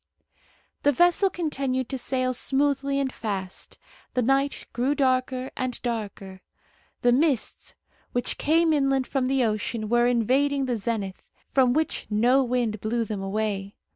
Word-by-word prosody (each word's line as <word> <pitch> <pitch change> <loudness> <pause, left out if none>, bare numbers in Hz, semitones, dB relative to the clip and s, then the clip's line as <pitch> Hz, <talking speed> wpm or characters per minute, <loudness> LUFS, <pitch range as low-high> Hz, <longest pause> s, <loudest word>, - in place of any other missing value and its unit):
The 290 - +4
vessel 350 +7 +4
continued 275 -8 -2
to 265 - -2
sail 255 0 0
smoothly 275 +2 +1
and 270 -2 -1
fast. 195 -4 -5 0.4
The 250 - +2
night 275 +3 +1
grew 255 +4 +1
darker 255 -1 0
and 255 -1 -3
darker. 205 -5 -4 0.6
The 245 - +5
mists, 275 -1 0 0.4
which 245 0 -1
came 325 +1 +3
inland 275 -2 +2
from 260 -1 -1
the 265 -1 +2
ocean, 215 0 -2
were 240 +1 +4
invading 270 +4 +2
the 245 -2 -1
zenith, 205 -3 -4 0.2
from 255 -2 +4
which 315 +2 -1
no 240 +6 +3
wind 240 -4 -1
blew 230 +2 0
them 210 -2 -4
away. 200 0 -2
255 Hz, 140 wpm, -25 LUFS, 225-275 Hz, 0.6 s, The